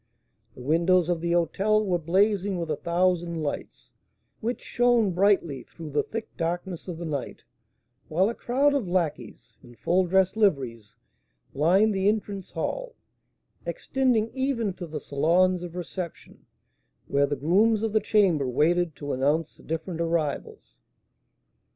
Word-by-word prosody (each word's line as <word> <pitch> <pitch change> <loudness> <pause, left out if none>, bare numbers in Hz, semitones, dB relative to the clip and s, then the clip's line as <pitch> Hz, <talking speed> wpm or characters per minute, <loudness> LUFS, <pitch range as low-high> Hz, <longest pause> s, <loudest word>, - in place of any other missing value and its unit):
The 125 - -10
windows 170 +4 +3
of 170 -2 0
the 170 0 0
hôtel 205 +5 +2
were 180 -3 +1
blazing 195 +3 +1
with 165 -2 -3
a - - +1
thousand 170 0 0
lights, 145 - -6 0.5
which 235 +2 -2
shone 240 -4 +2
brightly 180 -7 +2
through 160 +2 -10
the 145 - +2
thick 225 0 -7
darkness 175 +1 -3
of 175 -3 -5
the 170 - -6
night, 145 -4 -5 0.6
while 180 +5 +2
a 230 - -1
crowd 275 +5 +1
of 270 -9 0
lacqueys, 175 -4 -3
in 120 - -16
full 180 +8 +1
dress 190 +2 +3
liveries, 130 - 0 0.6
lined 190 +9 +3
the 190 0 +1
entrance 205 -3 -3
hall, - - -4 0.7
extending 245 -5 0
even 260 -6 -1
to 180 -1 -7
the 155 -1 -5
salons 175 +6 +2
of 175 -1 -7
reception, 180 -1 -7 0.6
where 140 0 +2
the 145 - -1
grooms 205 - +2
of 220 -2 -1
the 215 - +4
chamber 180 -10 +2
waited 165 +5 +1
to 145 -1 -4
announce 145 +5 0
the - - -18
different 165 +1 -4
arrivals. 165 -4 -3
175 Hz, 145 wpm, -26 LUFS, 160-205 Hz, 0.7 s, the